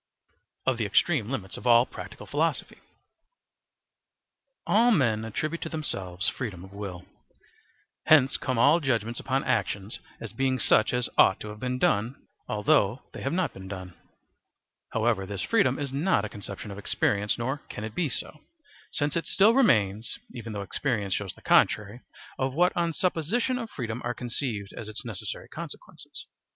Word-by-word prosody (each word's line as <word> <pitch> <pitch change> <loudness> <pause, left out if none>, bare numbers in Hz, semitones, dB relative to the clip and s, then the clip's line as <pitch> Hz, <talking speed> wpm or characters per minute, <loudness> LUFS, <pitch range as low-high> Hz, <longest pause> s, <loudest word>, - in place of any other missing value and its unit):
Of 130 -2 +2
the 110 - +1
Extreme 120 - +2
Limits 105 -8 -4
of - - -5
all 120 0 +7
Practical - - -9
Philosophy. - - -1 1.9
All 230 +4 +4
men 120 - +3
attribute 155 +9 -3
to - - -4
themselves 95 - -2
freedom 100 -9 -3
of 95 +1 -13
will. 95 -3 -6 1.0
Hence 140 -4 +6
come 130 -2 -1
all 145 +8 +6
judgements 120 -5 -1
upon 135 +1 0
actions 100 +3 -1 0.2
as - - -7
being 130 -1 +1
such 110 -2 +3
as 125 -1 0
ought 95 - +6
to 105 - -6
have 105 0 -9
been 125 +1 -2
done, 115 +1 +1 0.3
although 115 0 +2
they - - -7
have 135 - -1
not 180 +1 0
been 95 0 -10
done. 95 -2 -7 1.0
However, 110 -4 +1
this 100 -1 -4
freedom 225 -3 +3
is 140 -2 -4
not 145 - +2
a - - -5
conception 100 +1 -7
of 100 - -7
experience, 105 0 +1
nor 130 +4 -2
can 105 - -6
it 110 0 -5
be 165 +1 0
so, 140 +5 -4 0.5
since 145 0 0
it 165 - -1
still 210 +4 +5
remains, 110 - +3 0.2
even 115 -2 -7
though 100 -1 -4
experience 105 -3 -1
shows 100 -2 -3
the - - -19
contrary 105 +4 +3 0.4
of 130 0 -1
what 180 +2 +3
on 170 -1 +1
supposition 190 - 0
of 230 -2 -5
freedom 120 - -4
are 120 0 -2
conceived 115 -4 -3
as 110 - -7
its 110 +5 -6
necessary 110 -5 -4
consequences. - - -9
120 Hz, 165 wpm, -27 LUFS, 105-145 Hz, 1.9 s, all